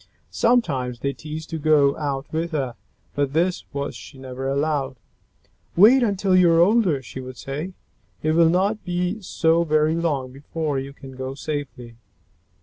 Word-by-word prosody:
Sometimes 140 - +1
they 140 0 -1
teased 155 +3 -8
to 160 - -3
go 145 -2 +4
out 140 -2 -3
with 165 +1 -2
her, 130 -5 -2 0.4
but 140 -1 -1
this 175 +3 +1 0.3
she 140 - -12
never 130 0 -6
allowed. 140 -1 0 0.8
"Wait 230 +9 +7
until 200 -4 +2
you 180 -2 +6
are 165 - +4
older," 180 - +3
she 125 - -8
would 130 -1 -9
say. 150 - -5 0.5
"It 155 - +2
will 165 0 +5
not 200 +5 +1
be 180 +4 -2
so 165 -2 +2
very 155 -1 +2
long 150 -6 -1
before 145 +1 -3
you 135 +1 -6
can 140 -1 -12
go 130 +1 -6
safely." 125 -6 -6
155 Hz, 155 wpm, -23 LUFS, 135-170 Hz, 0.8 s, Wait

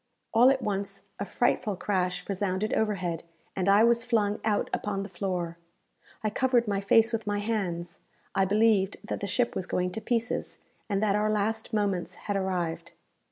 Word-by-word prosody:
All 240 +3 +7
at 270 -1 +1
once 200 -1 -2 0.2
a 200 - -2
frightful 215 -2 +1
crash 180 -2 -1
resounded 200 +1 -1
overhead, 185 -6 0 0.3
and 190 0 +1
I 200 +2 +6
was 235 0 +4
flung 210 -4 +1
out 215 -2 +1
upon 195 -1 -1
the 200 - -7
floor. 180 -4 -3 0.6
I 215 - 0
covered 245 0 +2
my 200 -1 0
face 225 +3 +4
with 220 -2 -2
my 205 0 0
hands 190 -5 -2 0.3
I 195 - +3
believed 205 -1 +3
that - - -4
the 200 - -3
ship 235 +5 +1
was 185 - -3
going 180 0 0
to 220 - -5
pieces, 235 +1 -1 0.3
and 200 0 +1
that 205 -2 +3
our 210 +1 +2
last 215 +2 -1
moments 200 -5 -1
had 205 - -4
arrived. 180 -4 -2
205 Hz, 175 wpm, -28 LUFS, 190-220 Hz, 0.6 s, All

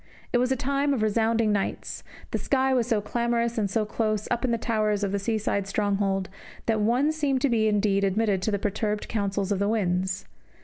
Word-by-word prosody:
It 245 - +4
was 250 +1 +1
a - - +3
time 280 +2 0
of 220 - -1
resounding 220 +1 +2
nights; 200 -1 -2 0.3
the - - -1
sky 265 -1 +1
was 245 -3 +2
so 225 -4 +1
clamorous 235 +1 0
and 205 -2 0
so 215 +2 0
close, 215 -1 -1
up 240 +1 0
in 255 - +1
the 235 - +1
towers 215 -2 0
of 200 - 0
the 200 - 0
seaside 200 -2 -1
stronghold, 195 -2 0 0.4
that 220 -2 +1
one 245 +8 +2
seemed 290 -4 0
to 280 - +3
be 220 -2 +2
indeed 205 -1 +2
admitted 200 0 +1
to 190 - 0
the 205 - +1
perturbed 210 +1 -2
counsels 200 -2 -1
of 195 - +1
the 200 +1 +1
winds. 190 -3 0
215 Hz, 210 wpm, -26 LUFS, 200-235 Hz, 0.4 s, It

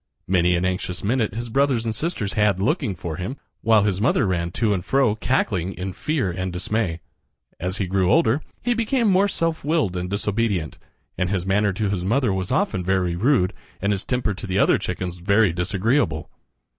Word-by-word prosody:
Many 90 -1 +3
an 85 +1 0
anxious 90 0 -2
minute 110 -1 0
his 120 0 -5
brothers 135 -3 +2
and 110 - -1
sisters 115 - -2
had 105 -3 +2
looking 115 - 0
for 80 -1 -5
him, 95 +10 -4 0.2
while 110 -2 +4
his 100 -2 0
mother 115 - +3
ran 85 -3 0
to 110 -1 +1
and 90 -3 -2
fro 130 +2 +2
cackling 100 -6 0
in 90 +1 -5
fear 140 - -1
and 90 +1 -3
dismay. 90 -1 -2 0.6
As 90 +3 -2
he 100 - -1
grew 95 0 +1
older 155 -4 +3 0.2
he 245 - +2
became 230 +1 +1
more 195 +1 +4
self 165 -4 -1
willed 150 - +1
and 90 0 -3
disobedient, 100 - -1 0.4
and 90 - +1
his 95 -2 -1
manner 100 +2 +2
to 105 +1 -1
his 95 -3 -2
mother 115 +2 +1
was 95 -1 -3
often 95 - 0
very 90 -2 +1
rude 105 -2 +2 0.3
and 100 +2 0
his 100 -2 -1
temper 125 -4 -1
to 100 +2 -7
the 95 0 -1
other - - +4
chickens 90 -1 -4
very 100 +1 +3
disagreeable. 90 - 0
100 Hz, 195 wpm, -23 LUFS, 90-115 Hz, 0.6 s, while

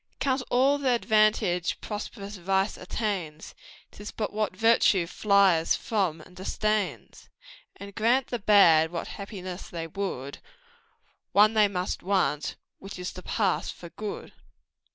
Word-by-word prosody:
"Count 265 -1 0
all 270 +3 +3
th' 280 - -6
advantage 215 -7 +2
prosperous 205 -1 -7
vice 190 +2 0
attains, 180 -6 -4 0.4
'Tis 205 +1 -9
but 215 -2 -4
what 210 -3 -2
virtue 225 -4 +4
flies 190 -2 +3
from 185 -8 -1
and 180 +3 -16
disdains; 210 +2 -3 0.5
And 200 0 -10
grant 235 +5 +2
the 240 - -3
bad 170 -6 +5
what 170 - -5
happiness 190 -3 -7
they 165 -1 -5
would, 160 -6 -5 0.9
One 210 +2 +6
they 215 -1 +5
must 185 -2 -3
want 185 -6 0 0.2
which 195 0 -9
is 180 0 -5
to 185 - -9
pass 195 -1 -1
for 170 - -9
good." 210 +3 -7
200 Hz, 130 wpm, -27 LUFS, 180-215 Hz, 0.9 s, One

